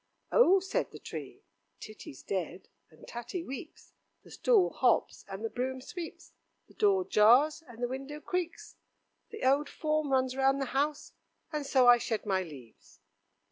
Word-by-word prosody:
"Oh!" 390 -6 +6
said 380 +1 -2
the - - -11
tree, - - -8 0.4
"Titty's 210 - -10
dead, 185 -1 -4 0.2
and 155 - -17
Tatty 240 +9 -5
weeps, 275 +1 -9 0.3
the - - -16
stool 445 -7 +3
hops, - - +1
and 195 +3 -6
the - - -1
broom 260 +1 -3
sweeps, 330 +6 -8 0.4
the - - -20
door 390 -3 +2
jars, 260 +9 +5
and 240 0 -9
the - - +2
window 270 +4 -6
creaks, 360 +5 -4 0.5
the 440 - -8
old 280 +2 +3
form 305 -2 -1
runs 260 -1 +1
round 270 +1 +2
the 270 - -1
house, 290 +2 -1 0.4
and 300 -3 -3
so 260 -2 +4
I 240 0 +8
shed 225 -2 -3
my 190 -2 +1
leaves." 115 - -12
270 Hz, 160 wpm, -30 LUFS, 225-310 Hz, 0.5 s, I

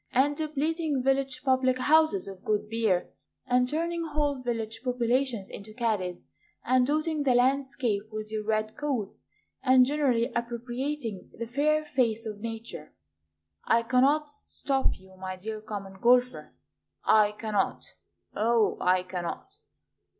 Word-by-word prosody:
And 275 +3 +3
depleting 310 -1 -1
village 270 +2 0
public 260 -1 +2
houses 305 -6 +3
of 195 -1 -9
good 210 0 0
beer, 215 -5 0 0.3
And 250 0 +2
turning 335 +4 -1
whole 290 -4 -1
village 225 -2 -3
populations 245 -3 0
into 215 +1 -10
caddies, 205 -7 -2 0.4
And 255 0 +3
dotting 310 +1 0
the 265 -3 +3
landscape 250 -4 +1
with 215 0 -5
your 215 -1 -2
red 215 0 -1
coats, 270 -9 -3 0.3
And 255 -1 +6
generally 260 -5 +1
appropriating 240 -1 -3
the 230 - -3
fair 300 +6 +1
face 235 -6 0
of 210 -2 -5
Nature. 225 -8 -7 0.7
I 230 0 +3
cannot 275 +5 +3
stop 280 -2 -2
you, 190 0 -18
my 185 0 -5
dear 215 +3 -6
Common 195 -3 -7
Golfer, 250 +1 +2 0.5
I 210 -1 +5
cannot, 210 -2 -1 0.5
O 225 0 +2
I 180 0 +3
cannot! 185 - -6
245 Hz, 130 wpm, -28 LUFS, 215-275 Hz, 0.7 s, And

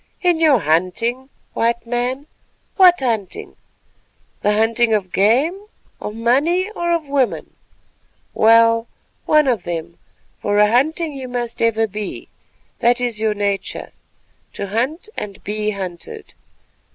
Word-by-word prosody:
"In 350 -2 +3
your 310 -5 +5
hunting, 205 - 0 0.2
White 235 0 0
Man; 245 +4 -2 0.5
what 360 -5 +6
hunting? 220 -7 -3 0.8
The 210 - +1
hunting 225 +1 +2
of 190 -4 -3
game, 280 - +2 0.3
of 210 - -5
money, 300 - +1
or 345 -5 -2
of 335 -2 0
women? 275 -3 -1 0.8
Well, 230 +1 +4 0.4
one 305 -2 +4
of 240 -7 +1
them, 170 -1 -6 0.4
for 205 0 0
a 210 0 +5
hunting 310 +6 +1
you 265 -2 -6
must 240 -1 -4
ever 225 -1 +2
be; 210 -1 -6 0.5
that 240 +1 +3
is 240 -3 -1
your 215 -1 0
nature, 200 -1 -3 0.6
to 200 - -5
hunt 260 - -2
and 200 -2 -7
be 210 0 -2
hunted. 200 - -7
230 Hz, 130 wpm, -19 LUFS, 210-275 Hz, 0.8 s, what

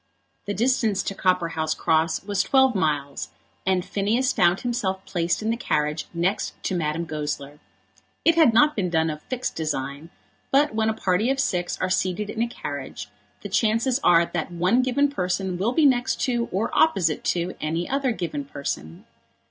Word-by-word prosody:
The 205 - -3
distance 225 -2 +1
to - - -3
Copperhouse 165 -4 0
Cross 160 +1 +1
was 200 -1 0
twelve 265 +1 +4
miles, 150 -7 -1 0.4
and 185 -2 +2
Phineas 230 +7 0
found 175 +2 +3
himself 205 -6 -2
placed 175 +2 -1
in 220 - +1
the - - 0
carriage 150 -8 -1
next 180 +5 -1
to 190 - -1
Madame 165 0 -1
Goesler. 150 -2 -5 0.7
It 335 - +6
had 320 -7 +5
not 295 +7 +4
been 185 -4 0
done 160 -1 +1
of 150 0 -7
fixed 255 -1 -4
design; 150 0 -3 0.4
but 285 0 +3
when 220 0 +1
a 220 - -1
party 195 +3 +1
of 270 0 0
six 175 -8 -1
are 185 - -1
seated 190 +3 0
in 225 - -3
a 235 - +2
carriage, 235 - -6 0.3
the - - -5
chances 230 +4 +2
are 170 0 +5
that 175 0 -4
one 180 +8 +2
given 260 +3 +2
person 185 -6 -2
will 215 +5 +1
be 315 +1 +4
next 250 -3 +2
to 240 -2 0
or 200 +5 -1
opposite 180 - +2
to 175 +1 0
any 165 +3 -2
other 275 -1 0
given 165 -9 -3
person. 135 - -6
190 Hz, 175 wpm, -24 LUFS, 165-235 Hz, 0.7 s, It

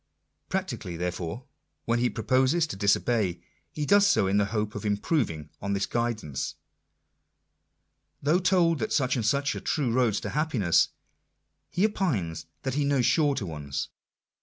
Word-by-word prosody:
Practically, 185 - -3
therefore, 90 +7 -4 0.4
when 115 +1 +1
he 120 0 +2
proposes 130 - +2
to 130 - -6
disobey, 100 -2 +1 0.3
he 150 - -3
does 200 +4 +5
so 200 - +3
in 95 +2 +2
the 105 - +3
hope 105 +1 -2
of - - -6
improving 105 - -1
on 100 0 -1
this 100 0 0
guidance! 115 - -2 1.6
Though 155 +5 +2
told 175 -3 +3
that - - -2
such 130 -3 +2
and 120 - -1
such 140 +6 +1
are - - -4
the - - -20
true 140 -7 0
roads 120 -4 +2
to - - -4
happiness, 130 - +2 0.8
he 180 +4 +2
opines 95 - -1 0.2
that 130 - -2
he 145 +2 +1
knows 140 -3 +2
shorter 140 -8 +2
ones 75 -5 -4
120 Hz, 155 wpm, -27 LUFS, 100-145 Hz, 1.6 s, does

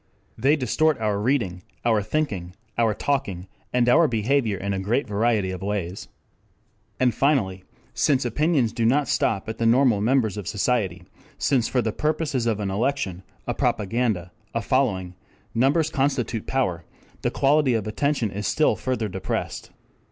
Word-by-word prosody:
They 135 +6 +3
distort 155 +2 +1
our 105 -2 0
reading, 105 -7 0 0.2
our 110 -3 +3
thinking, 100 - -2 0.2
our 115 -3 +2
talking 100 -12 -1 0.3
and 125 -1 +2
our 155 +7 +6
behavior 115 -2 +1
in 100 +2 -2
a 95 - -1
great 115 +9 0
variety 105 -2 +1
of 95 - -6
ways. 95 -2 -3 0.9
And 125 -2 +3
finally 100 -10 +1 0.3
since 135 -3 +2
opinions 135 -1 +1
do 115 - -1
not 135 +5 +3
stop 100 -3 0
at 110 0 -5
the 115 - +2
normal 120 -3 +4
members 110 -3 +2
of 100 -4 -5
society, 100 -5 0 0.3
since 130 -5 +2
for 125 -2 0
the 110 - 0
purposes 150 -5 -1
of 110 -2 0
an 100 -2 -2
election, 105 -4 -1 0.2
a - - -1
propaganda, 105 -4 0 0.2
a 115 - +1
following, 100 -9 0 0.4
numbers 140 +7 +2
constitute 130 -5 -1
power, 90 -11 0 0.4
the - - +1
quality 140 -2 +3
of 110 -2 -1
attention 120 0 0
is 105 +1 -3
still 155 - +3
further 125 -4 -2
depressed. 95 -1 -4
115 Hz, 155 wpm, -24 LUFS, 100-135 Hz, 0.9 s, our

